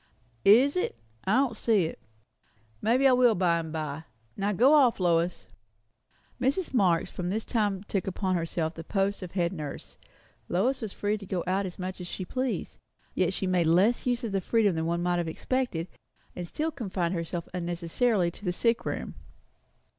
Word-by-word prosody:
"Is 250 +8 +6
it? 365 - -1 0.3
I 195 - +3
don't 260 -3 +2
see 215 -5 +2
it. 160 - -6 0.8
Maybe 245 +5 +4
I - - +6
will 245 -3 +5
by 175 -2 +2
and 160 -1 -5
by. 155 0 -4 0.3
Now 200 +1 0
go 245 +9 +5
off, 265 -8 +5
Lois." 170 -1 +1 1.0
Mrs. 280 +7 0
Marx 180 -8 +2
from 180 -1 -4
this 215 +4 -2
time 205 -4 0
took 195 -3 -2
upon 190 0 -1
herself 165 -1 -1
the 165 - -8
post 195 +3 -1
of 180 -2 -7
head 175 -1 0
nurse. 150 -5 -7 0.5
Lois 245 +10 +1
was 220 -3 -4
free 210 +2 -1
to 200 - -9
go 180 -2 -2
out 190 +2 0
as 180 - -9
much 185 0 -5
as 175 - -6
she 185 - -5
pleased. 255 +6 -3 0.3
Yet 185 -1 +1
she 190 - -3
made 180 -3 +2
less 195 +10 +3
use 245 0 0
of 225 - -2
this 195 -1 -1
freedom 215 -3 +3
than 160 0 -1 0.2
might 175 0 +1
have 170 -1 -1
been - - -2
expected, 250 -11 -2 0.5
and 175 -1 -5
still 310 - -2
confined 190 - -2
herself 170 0 -3
unnecessarily 175 +3 0
to 195 - -16
the 180 - 0
sick 230 +5 +1
room. - - -3
190 Hz, 185 wpm, -28 LUFS, 175-230 Hz, 1.0 s, Is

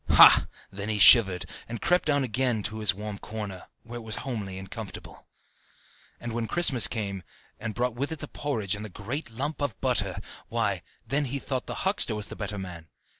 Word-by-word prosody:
Ha! - - +8 0.2
then 100 +2 -5
he 105 - 0
shivered, 95 -5 +7 0.2
and 120 -1 -5
crept 180 - +2
down 145 -2 +2
again 125 -2 0
to 110 +2 -2
his 105 -3 +4
warm 105 +1 -7
corner, 105 -4 -7 0.2
where 120 +1 -8
it - - -9
was 110 -1 -6
homely 105 -8 -4
and 95 0 -9
comfortable. - - -9 0.9
And 120 -1 -6
when 115 -1 -2
Christmas 135 - +6
came, 100 -4 -3 0.4
and 110 -1 -5
brought 125 0 0
with 140 +6 -3
it 160 - -3
the - - -7
porridge 110 -10 -2
and 105 +1 -4
the 110 - -7
great 120 - -5
lump 140 +7 -3
of 140 -8 -2
butter, - - 0 0.3
why, - - -1 0.2
then 140 +5 0
he 135 +2 -3
thought 130 -2 -4
the - - -5
huckster 125 - +1
the 105 - -4
better 105 -1 -5
man. 90 -4 -8
110 Hz, 195 wpm, -27 LUFS, 100-130 Hz, 0.9 s, Ha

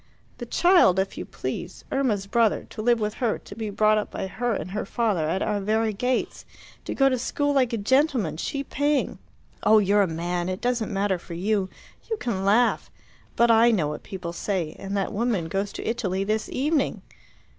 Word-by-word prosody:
The 240 - -6
child, 345 - +5
if 190 0 0
you - - -5
please - - -6
Irma's 230 -8 0
brother 225 +1 +1
to - - -6
live 240 +1 +3
with 210 -1 -1
her, 230 -4 +1
to - - -12
be 220 -2 -4
brought 215 +1 +3
up 210 - -4
by - - -4
her 240 +5 -2
and 180 +1 -5
her 210 +2 -2
father 195 -7 0
at 190 - 0
our 210 -1 0
very 220 +2 +1
gates, 250 +5 -1 0.4
to - - -4
go 270 - +4
to 255 -2 +1
school 285 +3 0
like 260 -4 +2
a 230 - -1
gentleman, 240 - +1
she 275 - -3
paying. 290 +1 0 0.4
Oh, 220 - +5
you're 205 0 +4
a 195 - +3
man! 175 +2 -2
It 185 +1 -3
doesn't 245 -3 -1
matter 195 -2 0
for 170 0 -9
you. 195 +1 0 0.4
You 445 - -1
can 225 - -2
laugh. 220 +5 +2 0.5
But 235 0 +4
I 230 +1 +6
know 175 -10 +1
what 150 - -5
people 180 -3 -6
say; 175 -4 -2
and 195 +1 -3
that 195 - -1
woman 215 -6 0
goes 195 +4 -2
to - - -6
Italy 200 -5 -1
this 215 +2 -1
evening." 290 +2 0
215 Hz, 200 wpm, -25 LUFS, 190-240 Hz, 0.5 s, I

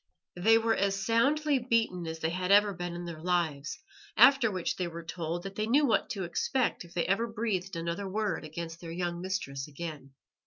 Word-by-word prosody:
They 220 +6 +5
were 225 0 +2
as 195 0 +1
soundly 280 +6 +3
beaten 225 -8 0
as 160 0 -4
they 160 0 -1
had 180 +2 -1
ever 205 0 +6
been 175 -1 -5
in 175 0 -6
their 165 -2 -7
lives, 165 - -1 0.4
after 270 -4 +7
which 185 -4 -2
they 180 - -2
were 170 0 -7
told 170 0 -4
that 195 - -6
they 215 +2 -2
knew 285 +6 +4
what 240 - +2
to 195 - -3
expect 235 +9 0
if 175 0 -16
they 170 - +1
ever 210 +5 +1
breathed 210 -5 -2
another 170 +4 -3
word 210 -2 -1
against 165 +2 -7
their 170 - -7
young 175 0 -3
mistress 155 -8 -3
again. 145 -3 -8
180 Hz, 200 wpm, -30 LUFS, 170-220 Hz, 0.4 s, after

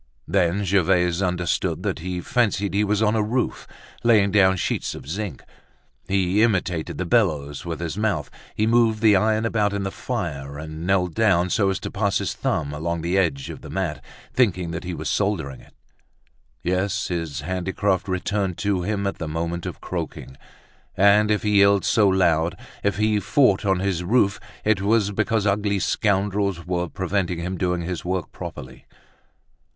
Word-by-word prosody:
Then 90 +2 +1
Gervaise 90 -1 +2
understood 90 -2 -1
that - - -2
he 90 +1 -4
fancied 105 -2 0
he 100 +1 +2
was 105 +1 +1
on 105 +1 +2
a 110 - +2
roof, 120 +4 -2 0.4
laying 105 -4 +4
down 95 -2 +4
sheets - - -2
of - - -10
zinc. 100 +5 -4 0.6
He 95 +1 +2
imitated 90 -7 0
the 95 - -2
bellows 75 - 0
with 85 -2 -4
his 85 +3 -4
mouth, 105 -9 -1 0.2
he 110 - +1
moved 115 -1 +3
the 105 -2 +6
iron 110 +3 +2
about 105 -3 +1
in 100 -1 -2
the 95 - -3
fire 75 - -4
and 80 +2 -6
knelt 90 -3 +2
down 95 -5 +2
so 100 -3 +2
as 95 -1 -1
to - - -5
pass 100 -1 +1
his - - -2
thumb 70 0 -2
along 85 +2 -2
the 85 +3 -1
edges 80 -8 0
of - - -8
the - - -10
mat, 80 -8 -3 0.3
thinking 90 -9 +1
that 85 +1 -5
he 90 -1 -4
was - - -5
soldering 90 -10 -1
it. - - -21 0.9
Yes, 95 +2 0
his 80 -5 -3
handicraft 95 +3 -1
returned 95 0 -1
to 100 -3 0
him 100 +2 -2
at 100 - -3
the 80 - -3
moment 85 +2 -3
of - - -7
croaking; 65 - -5 0.6
and 100 +2 +5
if 105 -1 +1
he 105 -1 +3
yelled 100 0 +4
so 105 -3 +4
loud, 85 -3 +2 0.3
if 100 -1 +1
he 105 0 +2
fought 105 -4 +3
on 95 -1 +2
his 95 -3 -1
roof, 100 0 +2 0.3
it 105 -2 +2
was 105 0 +2
because 105 +1 0
ugly 100 0 +1
scoundrels 100 -2 0
were 90 -1 -2
preventing 95 -1 -1
him 90 +3 -3
doing 90 -1 -1
his 85 0 -4
work 90 -1 -3
properly. 65 -1 -9
95 Hz, 175 wpm, -23 LUFS, 85-105 Hz, 0.9 s, the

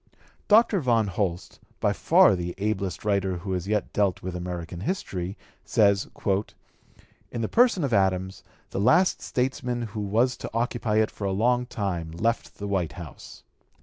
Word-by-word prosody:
Dr. 215 -1 +5
Von 120 -6 +2
Holst, 90 -2 -3 0.2
by - - +2
far - - +5
the 90 -1 -4
ablest 100 -2 -2
writer 100 -3 +1
who 95 +3 -6
has 90 0 -2
yet 105 0 -1
dealt 100 -3 +1
with 95 -1 -4
American 90 -1 -5
history, 95 - -3 0.3
says: 100 -2 +3 1.2
"In 115 - -3
the 110 - 0
person 230 - +3
of 135 -4 -1
Adams 95 -1 +1 0.3
the - - -3
last 175 - +4
statesman 125 -1 -2
who 110 - -4
was 115 +5 +1
to - - -6
occupy 120 -2 0
it 110 0 +3
for 100 - -6
a 95 - 0
long 120 +5 +1
time 95 -9 -3
left 115 +7 -1
the 100 - -5
White 95 -5 -1
House." 85 -4 -11
100 Hz, 160 wpm, -26 LUFS, 95-120 Hz, 1.2 s, Dr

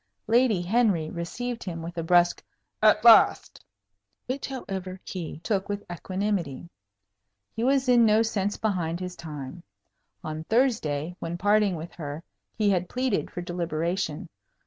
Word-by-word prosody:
Lady 230 -5 +3
Henry 190 -6 +1
received 235 +8 -4
him 165 -3 -5
with 170 +1 -7
a 170 - -2
brusque 175 +1 +3 0.4
"At - - +4
last," - - +6 0.6
which, 260 +2 -3
however, 190 -8 -6
he 175 -5 -6
took 200 -3 -1
with 205 0 -3
equanimity. 175 -4 -3 0.8
He 225 - -2
was 265 +1 +2
in 245 -2 +6
no 220 0 +5
sense 205 -3 -1
behind 175 -6 -1
his 180 -1 -5
time. 150 -1 -8 0.6
On 155 0 -5
Thursday, 180 - 0
when 170 +1 -4
parting 205 0 +3
with 165 +1 -7
her, 150 -1 -6 0.3
he 210 -2 +3
had 180 -2 0
pleaded 255 -4 -1
for 175 - -6
deliberation. 170 -2 -2
185 Hz, 140 wpm, -26 LUFS, 170-220 Hz, 0.8 s, last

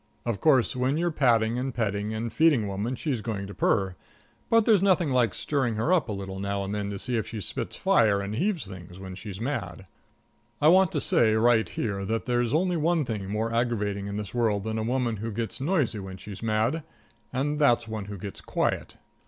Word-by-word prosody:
Of 115 -4 -2
course, 135 -4 +4
when 130 +3 +1
you're 175 +1 +1
patting 120 -5 +2
and 130 +1 -2
petting 105 -2 -1
and 110 +1 -3
feeding 150 -3 +4
a - - -3
woman 105 +6 -2
she's 130 -5 -2
going 105 -3 -3
to 100 - -8
purr, 95 -3 +1 0.5
but 230 -1 +4
there's 215 -5 +5
nothing 185 -6 +3
like 125 -3 +2
stirring 130 -6 0
her 115 +12 +1
up 170 -9 +2
a - - -1
little 95 -1 -5
now 100 0 -2
and 100 +1 -4
then 105 -1 -2
to 100 - -4
see 120 +4 -2
if 110 -1 -2
she 110 - -5
spits 95 - -4
fire 105 -3 +3
and 100 +1 -4
heaves 175 - 0
things 90 -2 -10
when 95 -1 -7
she's 100 0 -8
mad. 110 -8 -4 0.7
I 150 - +5
want 185 0 +5
to 145 - 0
say 110 -4 +3
right 115 0 +3
here 100 -3 -3
that 110 +3 -2
there's 120 -2 +1
only 175 +4 +2
one 165 -1 +1
thing 105 -5 -4
more 110 +2 -1
aggravating 105 -4 -1
in 100 0 -4
this 105 -2 -5
world 110 -5 +1
than 110 0 -2
a - - -1
woman 120 -1 0
who 110 +3 -4
gets 115 +4 -4
noisy 145 - +1
when 95 -1 -7
she's 100 +1 -9
mad, 115 +7 +1 0.5
and 145 +4 -1
that's 120 -6 +3
one 110 -2 -4
who 100 0 -7
gets 100 +2 -7
quiet. - - -2
115 Hz, 220 wpm, -27 LUFS, 100-135 Hz, 0.7 s, there's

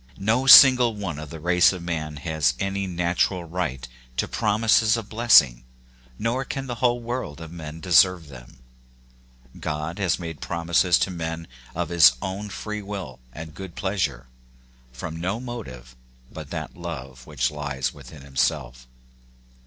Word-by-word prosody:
No 110 +7 0
single 125 -3 +9
one 95 -7 -5
of 75 -1 -8
the 80 - -9
race 90 +2 +4
of 90 -3 -7
man 80 -3 -4
has 80 -1 0
any 100 0 -2
natural 90 +1 0
right 80 -7 -4 0.3
to - - 0
promises 110 +1 +2
of 110 -3 -7
blessing, 75 - +4 0.5
nor 120 +4 -1
can 135 +1 -5
the 125 - -4
whole 120 -1 +2
world 120 - -5
of 80 -1 -9
men 80 -2 -8
deserve 90 -1 +3
them. 60 -4 -14 1.0
God 75 +4 -4
has 95 -4 +1
made 80 -5 -8
promises 85 +1 +1
to 95 - -1
men 80 -1 -5 0.3
of 85 -1 -2
his 80 -7 +6
own 95 +5 -5
free 105 +1 -6
will 95 -11 -7
and 80 +4 -9
good 95 0 -9
pleasure, 90 -11 -2 0.7
from 80 +6 -7
no 95 +6 -2
motive 65 - -9 0.4
but - - -9
that - - -6
love 65 -7 -8
which 70 -4 -1
lies 70 -4 -3
within 70 0 -13
himself. 65 -2 -2
85 Hz, 150 wpm, -24 LUFS, 75-100 Hz, 1.0 s, single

